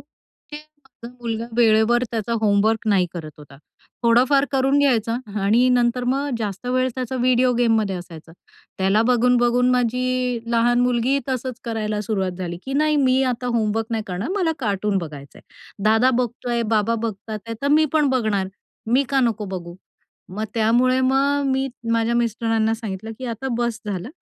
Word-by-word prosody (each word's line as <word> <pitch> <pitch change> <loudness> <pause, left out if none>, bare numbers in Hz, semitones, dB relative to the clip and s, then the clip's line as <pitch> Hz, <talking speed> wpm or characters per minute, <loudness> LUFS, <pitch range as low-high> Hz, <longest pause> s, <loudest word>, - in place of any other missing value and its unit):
माझा 295 -5 -15
मुलगा 230 -1 -3
वेळेवर 230 +1 +4
त्याचा 230 0 -3
होमवर्क 215 +1 +2
नाही 190 -3 +3
करत 160 -3 -7
होता. 145 -2 -14 0.5
थोडाफार 250 +4 +4
करून 270 +1 +2
घ्यायचा 235 -5 +2 0.3
आणि 230 +6 +3
नंतर 245 0 +2
मग 270 +3 0
जास्त 210 +1 -5
वेळ 255 +1 +1
त्याचा 255 0 -4
व्हिडिओ 250 0 +3
गेममध्ये 220 -5 +2
असायचा. 165 -2 -11 0.5
त्याला 195 +3 +3
बघून-बघून 245 0 +3
माझी 250 0 0
लहान 240 +1 +3
मुलगी 250 +2 +1
तसंच 255 -1 -3
करायला 215 -3 -2
सुरुवात 195 -3 -2
झाली 175 -2 -4
की, 270 - -5
"नाही, 305 +2 +2
मी 265 -2 +3
आता 245 +1 -6
होमवर्क 225 -2 0
नाही 225 -1 -1
करणार, 190 +5 -4
मला 350 -5 +1
कार्टून 205 -4 -1
बघायचंय. 145 -5 -9 0.4
दादा 225 +4 +4
बघतोय, 240 0 -2
बाबा 215 +2 +2
बघतात 220 -1 -4
आहे, 230 - -4
तर 280 - +1
मी 305 +2 +4
पण 305 -2 +3
बघणार 215 -7 0 0.4
मी 260 +3 +4
का 275 -1 +2
नको 230 -4 0
बघू?" 175 -1 -8 0.6
मग 215 +2 -2
त्यामुळे 240 +3 +3
मग 275 +2 +2
मी 265 0 0 0.3
माझ्या 230 +1 +1
मिस्टरांना 225 -1 0
सांगितलं 220 -1 -6
की, 260 - -7
"आता 240 +3 -4
बस 235 -2 -2
झालं, 195 0 -4
235 Hz, 155 wpm, -22 LUFS, 215-255 Hz, 0.6 s, वेळेवर